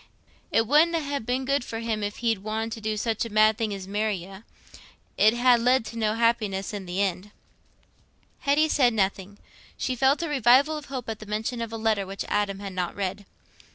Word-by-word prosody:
It 225 - +3
wouldna 320 +6 +4
ha' 285 -4 -3
been 250 +3 -1
good 275 0 +1
for 225 - -6
you 225 -1 -2
if 205 0 -3
he'd 225 -3 +2
wanted 220 +2 -3
to 225 -1 -6
do 215 0 -2
such 225 0 -1
a 230 - -5
mad 215 +1 +4
thing 220 -1 -2
as 195 -2 -6
marry 210 +1 0
you: 190 +2 -10 0.7
it 215 - +5
'ud - - -4
ha' 245 -1 +5
led 250 0 +3
to 230 - -8
no 220 -1 0
happiness 220 -4 0
i' 205 - -3
th' 185 -2 -11
end." 190 +1 -1 1.1
Hetty 290 +3 +2
said 250 -6 +3
nothing; 195 0 -1 0.4
she 255 - -2
felt 270 +6 +2
a - - -2
revival 275 +2 +4
of 300 -1 -7
hope 260 -3 -6
at 225 -2 -4
the 215 - -10
mention 220 +3 -3
of 230 -1 -4
a 225 - -4
letter 220 -3 0
which 195 +1 -5
Adam 205 -1 0
had 195 -1 -6
not 180 -1 -3
read. 200 0 -4
220 Hz, 215 wpm, -26 LUFS, 205-250 Hz, 1.1 s, it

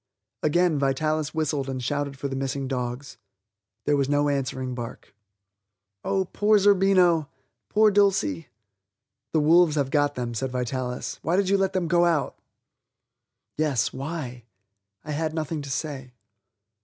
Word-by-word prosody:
Again 165 0 +2
Vitalis 155 +2 0
whistled 145 -3 -1
and 130 -1 -4
shouted 145 +1 -2
for 140 - -3
the 135 - -4
missing 135 0 -2
dogs. 125 +1 -4 0.7
There 145 - +3
was 140 -1 0
no 145 0 +2
answering 130 -2 -2
bark. 120 -3 -8 0.9
Oh, 190 -1 0
poor 210 +3 +3
Zerbino; 190 -6 +4 0.4
poor 215 0 +4
Dulcie! 195 - +2 0.8
"The 160 - +2
wolves 160 +1 +5
have 140 -3 0
got 145 -1 +2
them," 120 -1 -3
said 130 +3 -2
Vitalis; 125 0 -3
"why 170 - 0
did 195 0 +2
you 200 - +4
let 195 0 +1
them 185 -3 0
go 175 +1 +3
out?" 165 -5 0 1.2
Yes? 145 -7 0
why? 135 -4 -6 0.6
I 155 - -5
had 155 +1 -2
nothing 155 -1 -3
to 140 - -8
say. 135 -2 -4
145 Hz, 145 wpm, -25 LUFS, 135-170 Hz, 1.2 s, wolves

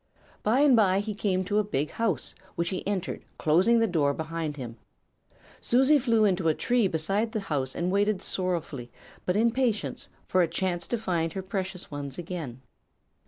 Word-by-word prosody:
"By 235 +6 +3
and 290 -4 +6
bye 195 -4 +4
he 210 +1 -3
came 195 -2 0
to 205 +3 +1
a - - +3
big 155 -8 -2
house, 205 - -1 0.2
which 170 0 0
he 190 - -3
entered, 200 -3 -2
closing 180 +10 +4
the 230 - +4
door 150 -8 +1
behind 160 -1 -4
him. 120 -3 -7 0.8
Susie 265 +5 +4
flew 230 -4 +3
into 185 -4 +2
a 155 - +3
tree 240 -4 +2
beside 195 +7 0
the 220 - 0
house 140 -9 -2
and 175 +1 -1
waited 205 0 +2
sorrowfully 170 -11 -3 0.4
but 180 - +2
in 230 +2 +4
patience 240 -4 -1 0.2
for 185 - +3
a 170 - +3
chance 175 +1 -2
to 240 - 0
find 170 -7 -1
her 190 - -4
precious 190 -2 -4
ones 140 -2 -5
again. 160 -8 -6
185 Hz, 180 wpm, -27 LUFS, 160-215 Hz, 0.8 s, and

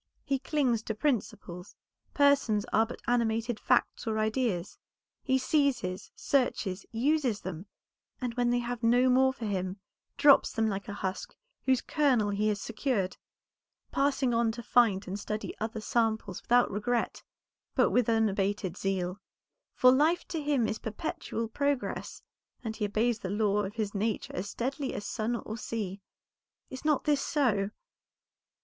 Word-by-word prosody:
He 275 -2 0
clings 260 -6 +1
to 220 - -2
principles; 210 -8 -2 0.4
persons 280 -8 +3
are 220 +1 +4
but 245 - -9
animated 230 -1 0
facts - - +1
or 220 -1 0
ideas; 215 -4 -1 0.4
he 265 -1 +2
seizes, 255 -9 0
searches, 220 -8 0
uses 250 -1 +1
them, 185 +1 -6 0.5
and 250 -2 -3
when 245 0 +1
they 245 - +2
have 245 0 -3
no 245 +2 +4
more 260 +1 +5
for 245 -3 -7
him, 190 -1 -2 0.4
drops 285 -2 +6
them 225 -1 +1
like 200 -3 -2
the 205 - -5
husk, 190 -1 -4 0.3
whose 260 -1 +4
kernel 255 -9 +2
he 205 +1 0
has 210 -1 0
secured; 220 -4 -1 0.7
passing 275 -2 +1
on 230 -1 +2
to 240 +1 -7
find 215 -6 +3
and 195 +2 -4
study 215 +1 -4
other 220 +1 -3
samples 220 -3 0
without 245 +1 +3
regret, 230 +4 -1 0.5
but - - +4
with 245 -2 +2
unabated 200 -4 +1
zeal. 190 0 -2 0.5
For 255 - +6
life 310 +7 +2
to 325 -3 -2
him 285 -6 +1
is 215 - -3
perpetual 225 +1 -4
progress, 280 +3 -2 0.4
and 220 -2 -4
he 215 - -1
obeys 220 +3 +1
the 185 - -5
law 205 0 +1
of 195 - -7
his 215 -3 -2
nature 215 +1 -2
as 190 +2 -3
steadily 265 +5 -3
as 205 - -5
sun 230 +1 -1
or 225 0 -6
sea. 205 -5 -4 0.7
Is 260 +1 -7
not 300 -3 +2
this 290 -2 +2
so?" 220 -10 +1
225 Hz, 155 wpm, -30 LUFS, 205-255 Hz, 0.7 s, drops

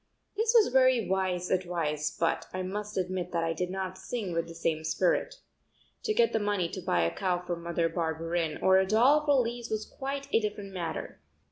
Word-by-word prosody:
This 445 +2 +2
was 425 - +4
very 255 -4 +4
wise 185 -2 -1
advice 165 -5 0
but 165 0 -1
I 185 0 -3
must 210 +2 -5
admit 180 -1 -2
that 170 -1 +1
I 165 0 0
did 180 +2 -2
not 185 0 -4
sing 195 -2 -4
with 165 0 -1
the 165 - -10
same 160 -1 -1
spirit. 180 - +1 0.7
To 435 - +1
get 470 0 +3
the - - +2
money 205 -4 0
to 185 - -6
buy 85 - +1
a 85 - 0
cow 185 -2 0
for 175 - -2
Mother 170 0 -1
Barberin 165 0 -2
or 190 0 +6
a 190 - +1
doll 255 +9 +5
for 280 -5 +3
Lise 235 0 -5
was 215 -1 -2
quite 275 +1 -5
a - - +6
different 205 -2 -4
matter. 175 -3 -5
185 Hz, 205 wpm, -29 LUFS, 170-220 Hz, 0.7 s, or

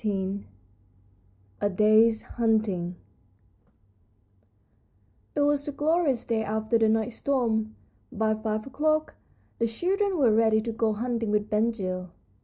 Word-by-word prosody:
XIV 195 -1 -2 1.2
A 205 - +2
DAY'S 215 +3 +4
HUNTING 215 -7 0 2.4
It 295 - +1
was 290 0 +1
a - - -2
glorious 295 -3 +1
day 225 -1 0
after 220 +2 0
the 220 -1 +3
night's 220 +1 0
storm. 225 -5 0 0.4
By 220 0 0
five 215 0 -3
o'clock 310 +3 0 0.5
the 230 - +2
children 380 - 0
were 255 -7 +4
ready 220 0 +4
to 230 +1 -3
go 225 -1 0
hunting 230 0 -2
with 210 +1 0
Ben 215 +2 +2
Gile. 185 -5 -4
225 Hz, 125 wpm, -26 LUFS, 215-250 Hz, 2.4 s, DAY'S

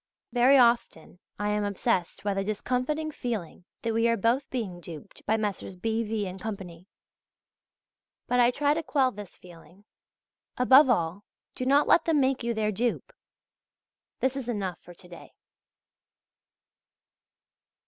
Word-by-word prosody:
Very 255 +3 +5
often 235 -9 +2 0.2
I 205 0 -1
am 210 0 0
obsessed 190 -3 -1
by 200 -1 0
the 195 0 -1
discomfiting 255 +9 -2
feeling 215 - -5 0.2
that 230 -1 -1
we 230 +1 +2
are 230 0 +2
both 235 +6 +1
being 210 -9 -4
duped 170 +3 -11
by 220 - +2
Messrs. 205 -3 -4
B. 220 +5 -1
V. 215 -2 -2
and 185 0 -7
Co. 220 0 -3 1.7
But 250 - +1
I 240 0 +6
try 285 +3 +1
to 325 - -2
quell 270 -5 +1
this 205 -3 -10
feeling.{Z} 180 +3 -17 0.7
Above 260 +2 +6
all, 175 -3 0 0.3
do 255 - -4
not 280 +2 +4
let 325 - +4
them 320 -3 +2
make 265 -1 +1
you 235 0 -1
their 215 -1 0
dupe.... 235 +4 -2 1.1
This 260 0 +1
is 270 -3 -5
enough 195 -6 -3
for 175 - -14
to 180 - -14
day. 175 - -13
225 Hz, 150 wpm, -27 LUFS, 195-255 Hz, 1.7 s, I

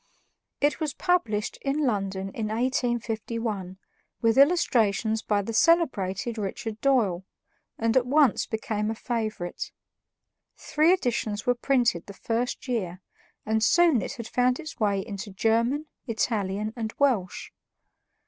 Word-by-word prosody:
It 290 +3 +2
was 310 -3 -2
published 230 - 0
in 280 +2 0
London 195 -4 -1
in 220 +1 -3
1851, 225 -4 -2 0.4
with 225 -1 +2
illustrations 230 - +3
by 205 -3 0
the 230 - -5
celebrated 230 - +2
Richard 215 +2 -4
Doyle, 220 -10 +2 0.5
and 225 0 0
at 255 -1 +3
once 280 -3 +3
became 215 -1 -2
a 225 - -2
favorite. 215 -7 -4 0.9
Three 310 +3 +2
editions 235 - 0
were 245 - +4
printed 245 -8 +1
the 200 - -9
first 235 +6 -2
year, 185 -8 -2 0.5
and 220 0 +1
soon 335 -4 +4
it - - -4
had 235 -4 -7
found 250 +1 +1
its 320 -1 -8
way 200 -3 +1
into 205 -1 -6
German, 230 +9 +1 0.2
Italian, 215 -2 -1
and 225 -2 -4
Welsh. 235 -11 0
225 Hz, 130 wpm, -26 LUFS, 210-255 Hz, 0.9 s, were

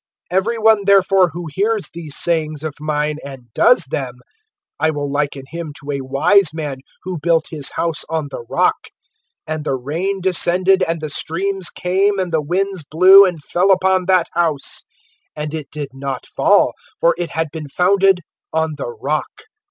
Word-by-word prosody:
(24)Every 210 +5 +1
one, 220 -2 +4
therefore, 195 -2 +4
who 170 +3 -7
hears 210 +3 0
these 160 -4 -6
sayings 155 -3 -1
of 155 -2 -3
mine[7:24], 150 0 -1
and 130 -5 -11
does 245 - +4
them, 130 -2 -4 0.6
I - - +2
will 145 -2 -3
liken 145 -1 -2
him 165 -2 -6
to 145 0 -6
a 140 -1 -3
wise 150 +6 +3
man, 150 -4 -4 0.3
who 185 -2 -4
built 165 +1 +2
his 150 -4 -4
house 165 -3 -1
on 160 -3 -2
the - - -6
rock. - - +1 0.6
(25)And 155 -1 -3
the 135 - -1
rain 165 +10 -3
descended, 185 +1 +2
and 165 -3 -1
the 155 - -4
streams 190 +4 -2
came, 195 +3 0
and 185 -3 -2
the 160 - +2
winds 185 +3 -1
blew, 185 +6 +7
and 175 -5 -3
fell 180 +6 +1
upon 190 -1 +3
that 185 -3 +4
house; 160 -5 -1 0.5
and 150 0 -5
it 155 -4 -5
did 145 -3 -5
not 135 -1 -5
fall, - - +3 0.3
for 170 - +4
it 175 -2 -2
had 160 -1 -2
been 155 -3 -7
founded 190 +3 +3 0.3
on 160 0 0
the 140 - -4
rock. 135 +7 -4
165 Hz, 175 wpm, -18 LUFS, 150-190 Hz, 0.6 s, blew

